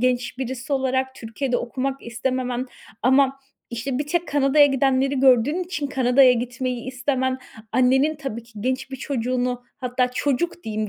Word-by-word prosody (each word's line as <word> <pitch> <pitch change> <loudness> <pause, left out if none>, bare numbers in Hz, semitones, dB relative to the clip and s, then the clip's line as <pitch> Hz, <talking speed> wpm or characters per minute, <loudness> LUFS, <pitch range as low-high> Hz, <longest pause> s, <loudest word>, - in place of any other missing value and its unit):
genç 250 0 0
birisi 260 +1 -4
olarak 260 0 0
Türkiye'de 245 +2 -2
okumak 265 +3 -3
istememen 250 +1 -2 0.4
ama 265 +2 +4 0.3
işte 250 +3 -3
bir 290 - -2
tek 345 +2 -1
Kanada'ya 285 +1 +5
gidenleri 270 0 +1
gördüğün 270 +7 +4
için 305 -5 -3
Kanada'ya 260 -1 +5
gitmeyi 250 0 -3
istemen, 260 0 -1 0.3
annenin 265 +4 +3
tabii 235 -5 -5
ki 230 0 -21
genç 260 +3 -2
bir 265 - -5
çocuğunu 250 -1 -2 0.2
hatta 250 -1 0
çocuk 295 +7 -1
diyeyim 215 -1 -2
260 Hz, 145 wpm, -23 LUFS, 250-275 Hz, 0.4 s, Kanada'ya